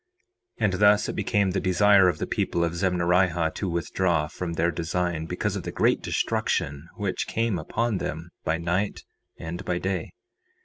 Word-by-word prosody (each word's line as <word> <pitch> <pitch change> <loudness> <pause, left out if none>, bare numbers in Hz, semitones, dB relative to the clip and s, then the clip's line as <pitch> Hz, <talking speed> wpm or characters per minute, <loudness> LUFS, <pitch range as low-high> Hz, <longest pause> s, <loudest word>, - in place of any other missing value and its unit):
4:22 - - +2
And 100 - +1
thus 105 0 +5
it - - -4
became 100 -1 +1
the 95 - 0
desire 95 +1 +5
of - - -2
the - - -2
people 85 - 0
of 85 - +1
Zemnarihah 90 -1 +2
to 95 - -3
withdraw 85 -1 0
from 85 +2 -5
their 85 +1 +1
design, 85 0 -2
because 95 +3 -2
of 100 - -3
the - - -5
great - - +2
destruction 70 +3 -1
which 100 -4 -2
came 115 -5 0
upon 110 +6 -1
them 80 +2 -5
by 80 - 0
night 90 +4 -1 0.3
and 85 +4 -6
by 90 -1 -1
day. 95 -2 -2
90 Hz, 175 wpm, -26 LUFS, 85-100 Hz, 0.3 s, thus